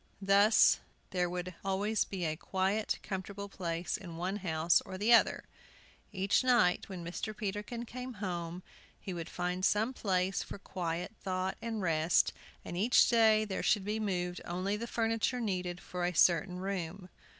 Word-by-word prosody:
Thus 200 +3 +5 0.3
there 180 -1 0
would 180 +1 -4
always 200 +3 +1
be 185 -3 -4
a 155 -1 -1
quiet, 190 +5 -1
comfortable 200 +1 -5
place 175 -3 -3
in 170 -4 -9
one 185 +4 -2
house 165 -3 +2
or 185 - -8
the 215 +5 +4
other. 230 - +4 0.7
Each 195 +3 +2
night, 240 -9 +3
when 180 -3 -6
Mr. 210 +5 -5
Peterkin 210 +3 -4
came 250 +2 -7
home, 180 -4 -4 0.4
he 190 - -6
would 170 -2 -5
find 180 +1 -3
some 210 +5 +2
place 190 -4 0
for - - -7
quiet 175 -1 -4
thought 185 0 -2
and 225 -3 -3
rest, 165 -1 +3 0.3
and - - -6
each 215 +7 +5
day 220 -2 +5
there 195 -3 -3
should 205 -3 +2
be 210 +1 -1
moved 180 -4 -2
only 185 +4 -2
the 230 +3 -4
furniture 225 +2 0
needed 180 -5 -2
for 180 0 -5
a 175 0 0
certain 180 +3 +4
room. 185 -1 -4
190 Hz, 160 wpm, -32 LUFS, 180-210 Hz, 0.7 s, Thus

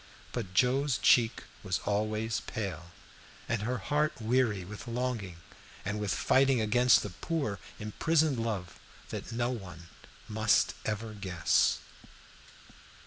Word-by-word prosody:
But 100 -7 -5
Joe's 130 +4 +3
cheek 115 -2 +4 0.2
was 95 -2 -1
always 110 +2 0
pale, 95 -6 -4 0.6
and 115 -2 0
her 125 +4 -1
heart 150 +9 0
weary 110 -4 +1
with 105 +5 -9
longing 115 -7 -3 0.5
and 105 +2 -2
with 105 -2 -1
fighting 135 -1 +3
against 120 +3 +4
the 105 - -5
poor 110 - -2 0.2
imprisoned 145 +6 +1
love 105 -6 -3 0.3
that - - -6
no 120 +1 0
one 90 -8 -8 0.4
must 110 0 +3
ever 110 +1 -3
guess. 95 -5 +2
110 Hz, 120 wpm, -30 LUFS, 100-125 Hz, 0.6 s, cheek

